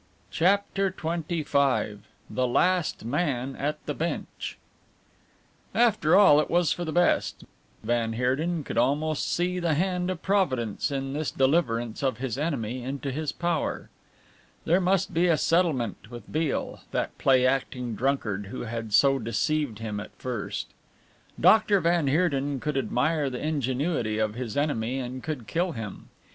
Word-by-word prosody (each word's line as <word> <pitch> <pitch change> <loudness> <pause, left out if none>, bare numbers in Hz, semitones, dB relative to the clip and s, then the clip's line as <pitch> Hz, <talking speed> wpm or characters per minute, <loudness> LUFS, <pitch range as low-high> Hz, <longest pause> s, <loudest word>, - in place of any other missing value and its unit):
CHAPTER 195 +2 +2
XXV 155 - 0 0.3
THE 130 0 0
LAST 180 +2 +1
MAN 135 -1 -1
AT 150 +2 -3
THE 145 - -2
BENCH 165 +4 -4 1.2
After 215 -8 +4
all, 190 -7 +7
it 150 - 0
was 175 -2 +2
for 175 - -1
the 160 - -3
best 175 +2 +1 0.4
van 115 -1 0
Heerden 145 +8 0
could - - -2
almost 145 +5 +1
see 180 +1 0
the 170 -3 +1
hand 180 +2 0
of 185 -3 -4
Providence 130 - 0
in 135 -1 -3
this 150 -2 -1
deliverance 125 -5 +1
of 135 -2 0
his 125 0 -3
enemy 130 -6 -2
into 135 +2 -4
his 150 +2 -2
power. 170 -2 -2 0.7
There 175 +4 +3
must 185 0 +1
be 170 +2 +3
a 165 -3 +4
settlement 150 - 0
with 120 -3 -10
Beale, 155 -1 -1
that - - -2
play 130 -2 +4
acting 130 -2 -1
drunkard, 105 -6 -1
who 115 - -6
had 115 -2 -5
so 135 +4 +5
deceived 115 +3 -1
him 110 -2 -4
at 105 - -9
first. 125 -5 -4 0.7
Dr. 215 -2 +5
van 170 -3 +2
Heerden 140 -3 +1
could 150 +2 -3
admire 140 +3 +1
the 125 - -5
ingenuity 135 -5 -1
of 110 -1 0
his 120 -1 -5
enemy 130 -4 0
and 130 0 -5
could 145 -6 -5
kill 170 - -1
him. 110 -5 -7
140 Hz, 150 wpm, -27 LUFS, 125-170 Hz, 1.2 s, all